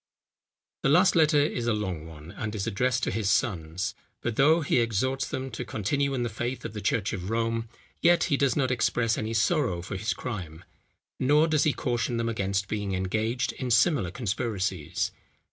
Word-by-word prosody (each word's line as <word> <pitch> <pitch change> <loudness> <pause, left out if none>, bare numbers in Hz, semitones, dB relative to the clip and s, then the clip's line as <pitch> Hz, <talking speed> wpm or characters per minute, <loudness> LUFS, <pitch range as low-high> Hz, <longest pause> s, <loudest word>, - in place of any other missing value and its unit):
The - - +2
last 180 +7 +5
letter 155 -2 +5
is 135 -5 0
a 115 - +2
long 90 -7 -4
one, 80 +1 -11
and 110 +2 -5
is 100 - -2
addressed 125 +3 0
to - - +1
his 110 -3 -1
sons; 90 -5 0 0.3
but 120 -2 -2
though 155 +6 +5
he 140 - +2
exhorts 120 +4 0
them 130 0 -4
to 115 - -4
continue 140 +7 -1
in 125 - -1
the - - 0
faith 120 +3 -4
of 110 - -5
the 105 - -5
church 100 -1 0
of 90 0 -4
Rome, 115 0 -1 0.3
yet 175 0 +5
he 145 - +2
does 140 -1 +2
not 130 -3 +1
express 115 -1 +1
any 110 +1 -3
sorrow 115 - +1
for 95 - -5
his 105 +5 -1
crime; 90 -9 -6 0.6
nor 150 +4 +4
does 155 -2 +2
he 150 - +3
caution 120 -2 -1
them 115 0 0
against 100 -3 -1
being 100 -2 -2
engaged 110 +6 -1
in 130 - -4
similar 125 - +3
conspiracies. 100 - -2
115 Hz, 190 wpm, -27 LUFS, 100-130 Hz, 0.6 s, last